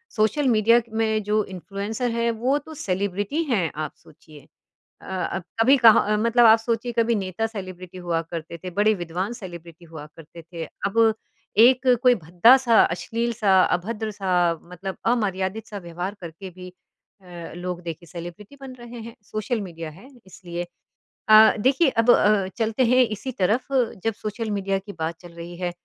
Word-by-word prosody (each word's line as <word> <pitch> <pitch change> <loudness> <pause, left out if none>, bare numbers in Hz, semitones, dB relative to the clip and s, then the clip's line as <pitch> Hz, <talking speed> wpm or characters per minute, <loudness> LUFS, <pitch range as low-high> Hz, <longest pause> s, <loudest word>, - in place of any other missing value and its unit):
Social 230 +6 +1
media 230 0 +4 0.2
में 220 -1 +1
जो 210 +1 +1
influencer 200 +6 -4
है 235 0 0
वो 250 +5 0
तो 305 +2 -9
सेलिब्रिटी 200 - -1
हैं 200 - 0
आप 150 - -9
सोचिए। 155 -1 -18 0.5
अ - - -14
अ, 185 0 -3 0.2
कभी 260 +5 +6
कहाँ 220 -3 +5
मतलब 235 +2 +3
आप 225 0 +7
सोचिए 230 +1 -2
कभी 230 0 +2
नेता 195 +1 -2
सेलिब्रिटी 185 -4 -9
हुआ 175 -2 -1
करते 165 0 -7
थे, 185 - -4
बड़े 205 +4 +2
विद्वान 180 +4 -4
सेलिब्रिटी 175 -6 -11
हुआ 155 -2 -10
करते 165 +1 -13
थे। 165 0 -8 0.2
अब 225 +2 +3 0.4
एक 250 +3 +5 0.2
कोई 250 -1 +6
भद्दा-सा, 225 +8 +5
अश्लील-सा, 215 +1 +1
अभद्र-सा, 190 -4 0 0.2
मतलब 190 +2 -6 0.2
अमर्यादित-सा 205 -1 -3
व्यवहार 175 +3 -4
करके 170 +3 -9
भी 180 0 -11 0.5
अ, 175 -3 -10
लोग 180 0 -5
देखे 170 0 -7
सेलिब्रिटी 175 - -10
बन 265 -1 -8
रहे 240 0 -10
हैं। 230 - -10 0.2
सोशल 215 +2 -2
मीडिया 165 -4 -7
है 190 +11 -15 0.2
इसलिए। 175 -2 -7 0.7
अ, 215 0 +8
देखिए 265 +7 +3
अब 230 -1 0
अ, 205 -4 +3
चलते 225 +2 +1
हैं 250 +2 +5
इसी 260 +6 -6
तरफ 215 +8 +2 0.4
जब 225 - 0
सोशल 215 +1 -4
मीडिया 195 -1 -1
की 200 +1 -10
बात 160 +1 -3
चल 175 -1 -12
रही 170 +1 -9
है 180 -1 -2
200 Hz, 160 wpm, -23 LUFS, 175-230 Hz, 0.7 s, अ